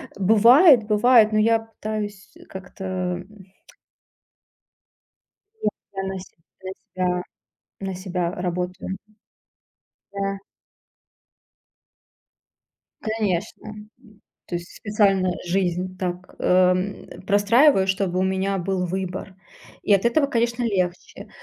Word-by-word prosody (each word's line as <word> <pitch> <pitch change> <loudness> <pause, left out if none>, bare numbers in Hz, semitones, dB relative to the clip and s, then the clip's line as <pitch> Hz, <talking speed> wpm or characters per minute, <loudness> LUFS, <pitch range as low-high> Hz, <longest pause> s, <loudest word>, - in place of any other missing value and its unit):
бывает 230 - +6
бывает, 220 0 +5
но 215 - +2
я 225 +1 +3
пытаюсь 215 -2 -6 0.2
как-то, 190 0 -10
м 185 +2 -5 2.2
Нет, - - +1 0.2
я 195 - -4
на 190 0 -4
себя 170 -3 -15 0.2
на 190 - -5 0.2
себя 180 -1 0 0.6
на 190 -1 -4
себя 180 -2 -3
работаю. 180 +1 -4 1.2
Да. 195 0 -3 2.6
Конечно, 215 -2 -2
м. 210 0 -11 0.6
То 175 - -5
есть 175 +1 -7
специально 195 -3 +1 0.2
жизнь 185 0 -1
так, 180 0 -5
эм, 185 +2 +2 0.2
простраиваю, 205 +2 +4
чтобы 190 -1 0
у 185 - +2
меня 190 +1 0
был 185 0 -1
выбор. 185 +1 -5 0.5
И 205 - +3
от 195 - +3
этого, 280 +4 +3
конечно, 235 -1 0
легче. 185 -6 -3
195 Hz, 100 wpm, -23 LUFS, 185-215 Hz, 2.6 s, бывает